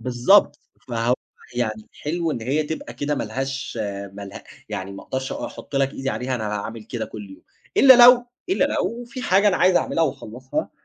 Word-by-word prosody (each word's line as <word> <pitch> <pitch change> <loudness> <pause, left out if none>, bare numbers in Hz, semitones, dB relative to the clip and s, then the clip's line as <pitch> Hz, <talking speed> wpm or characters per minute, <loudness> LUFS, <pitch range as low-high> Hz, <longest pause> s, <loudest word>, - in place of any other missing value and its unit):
بالضبط، 125 - +4 0.3
فهو 120 0 +1 0.4
يعني 110 -3 -3
حلو 165 +2 -2
إن 120 - -3
هي 140 +6 0
تبقى 150 -6 -6
كده 145 +4 -1
ما 140 - -2
لهاش 135 +4 -4 0.4
ما 100 - -9
له 100 - -10 0.3
يعني 95 +1 -5
ما 100 - -9
أقدرش 130 0 -4
أحط 140 - -6
لك 135 0 +1
إيدي 135 0 -3
عليها 130 +1 -2
أنا 115 -3 -3
هاعمل 110 +2 -5
كده 115 0 -4
كُلّ 105 -2 -9
يوم، 95 - -14 0.3
إلّا 260 -3 +9
لو 245 -1 +7 0.2
إلّا 375 - +2
لو 240 +1 -2
في 255 +2 -8
حاجة 200 0 +4
أنا 190 - +2
عايز 180 0 +4
أعملها 165 - +1
وأخلّصها 130 -2 -4
130 Hz, 190 wpm, -23 LUFS, 115-170 Hz, 0.4 s, إلّا